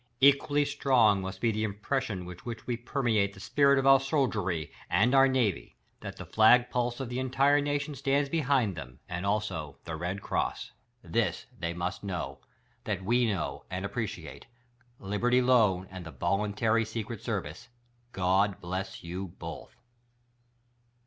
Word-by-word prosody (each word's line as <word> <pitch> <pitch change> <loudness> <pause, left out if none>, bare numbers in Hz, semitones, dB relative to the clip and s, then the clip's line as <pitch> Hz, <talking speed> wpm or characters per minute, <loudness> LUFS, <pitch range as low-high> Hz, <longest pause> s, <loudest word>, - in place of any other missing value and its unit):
Equally 140 +1 +4
s'trong 130 -8 +3
must 95 0 -6
be 115 - +3
the 110 0 -2
impression 105 -1 -2
vrith 90 -1 -9
which 115 -2 -7
we 120 - -1
permeate 115 -5 0
the - - -12
spirit 140 +6 +3
of 135 - +1
our 135 0 +7
soldiery, 110 - -1 0.2
and 105 +9 +3
our 135 0 +7
navy— 110 - 0 0.2
that - - -8
the - - -7
flag 120 +3 +5
pulse 120 -1 -1
of 135 - -3
the 125 +2 -3
entire 135 +3 +3
nation 145 0 -1
stands 140 +1 +1
behind 135 - +1
them; 65 -4 -9
and, 90 +1 -3
also, 100 -9 -2
the 80 - -4
Red 90 +5 -4
Cross. - - -2 0.3
This 115 -1 -1
they 85 0 -4
must 85 +3 -3
know: 85 -9 -4 0.5
That 95 -3 -3
we 120 +3 +3
know, 100 -4 -3
and 90 +2 -3
appreciate. 100 -8 -5 0.5
Libertv 120 +6 +1
Loan 105 -8 +3
and 95 -1 -7
the 80 - -8
Voluntary 105 +6 +1
Secret 110 -1 -5
Service 90 - -4 0.2
— 120 0 -39
God 95 +2 +2
Bless 95 +2 -5
You 90 +3 -5
Both 85 -1 -8
110 Hz, 155 wpm, -29 LUFS, 95-130 Hz, 0.5 s, our